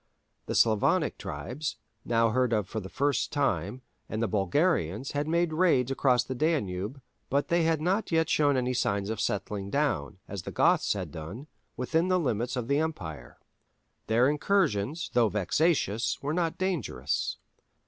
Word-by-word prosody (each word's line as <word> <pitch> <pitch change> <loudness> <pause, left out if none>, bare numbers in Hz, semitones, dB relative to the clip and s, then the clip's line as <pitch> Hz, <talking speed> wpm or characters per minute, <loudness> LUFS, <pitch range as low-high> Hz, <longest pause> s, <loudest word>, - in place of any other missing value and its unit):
The - - -2
Slavonic 110 -3 +3
tribes, 145 +5 -4 0.3
now 115 -1 +3
heard 125 0 +1
of 105 -3 0
for 110 - -4
the 95 -2 -8
first 140 +4 0
time, 125 - -1 0.3
and 110 - -3
the 115 - +1
Bulgarians 105 - +1
had 145 +1 -2
made 170 0 +1
raids 155 -7 +3
across 125 -2 +3
the 125 - -5
Danube, 120 - -1 0.3
but 140 +2 0
they 170 0 +3
had 165 -1 +2
not 185 +7 0
yet 160 -1 +3
shown 145 -3 +3
any 125 0 0
signs 100 -4 0
of 110 -1 -3
settling 100 -2 -2
down—as 100 - -2
the - - -7
Goths - - +3
had - - -5
done—within 115 - -4
the 185 0 +3
limits 125 -4 -1
of 125 -2 -3
the 140 +2 +2
empire. 80 - -5 0.7
Their 115 +3 +4
incursions, 150 - 0
though 120 -3 +4
vexatious, 115 - +1
were 145 +2 -1
not 165 -1 0
dangerous. 185 - -2
125 Hz, 155 wpm, -28 LUFS, 105-155 Hz, 0.7 s, Their